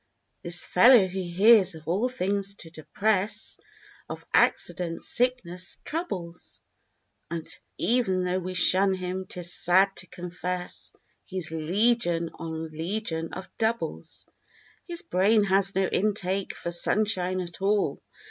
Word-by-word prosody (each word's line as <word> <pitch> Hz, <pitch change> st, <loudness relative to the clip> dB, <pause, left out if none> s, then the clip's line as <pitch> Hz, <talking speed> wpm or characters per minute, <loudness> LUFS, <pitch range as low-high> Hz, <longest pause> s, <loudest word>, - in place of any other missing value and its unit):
This 175 Hz, +1 st, +4 dB
fellow 235 Hz, +2 st, +6 dB
who 190 Hz, +1 st, -4 dB
hears 190 Hz, +1 st, +4 dB
of 160 Hz, 0 st, -14 dB
all 200 Hz, +9 st, 0 dB
things 200 Hz, -4 st, -2 dB
to 165 Hz, -5 st, -11 dB
depress; 205 Hz, +6 st, -2 dB, 0.5 s
Of -, -, -8 dB
accidents, 170 Hz, -2 st, +1 dB
sicknesses, 235 Hz, -8 st, 0 dB
troubles; 185 Hz, -, -5 dB, 0.7 s
And 165 Hz, -1 st, -5 dB, 0.3 s
e'en 220 Hz, -6 st, +1 dB
though 180 Hz, +1 st, -1 dB
we 185 Hz, 0 st, -6 dB
shun 190 Hz, +3 st, +5 dB
him, 185 Hz, 0 st, -5 dB
'tis 175 Hz, -1 st, -4 dB
sad 190 Hz, +3 st, +3 dB
to 185 Hz, -, -3 dB
confess. 180 Hz, +1 st, -5 dB, 0.3 s
He's 185 Hz, -4 st, -2 dB
legion 175 Hz, +1 st, +1 dB
on 160 Hz, -1 st, -6 dB
legion 165 Hz, 0 st, -4 dB
of 190 Hz, -, -9 dB
doubles. 225 Hz, +1 st, -3 dB, 0.6 s
His 345 Hz, -1 st, -4 dB
brain 205 Hz, +4 st, +2 dB
has 195 Hz, 0 st, +2 dB
no 190 Hz, 0 st, +2 dB
intake 195 Hz, -1 st, -1 dB
for 170 Hz, -, -5 dB
sunshine 185 Hz, 0 st, +3 dB
at 175 Hz, 0 st, -6 dB
all. 200 Hz, +1 st, 0 dB
185 Hz, 125 wpm, -26 LUFS, 175-205 Hz, 0.7 s, fellow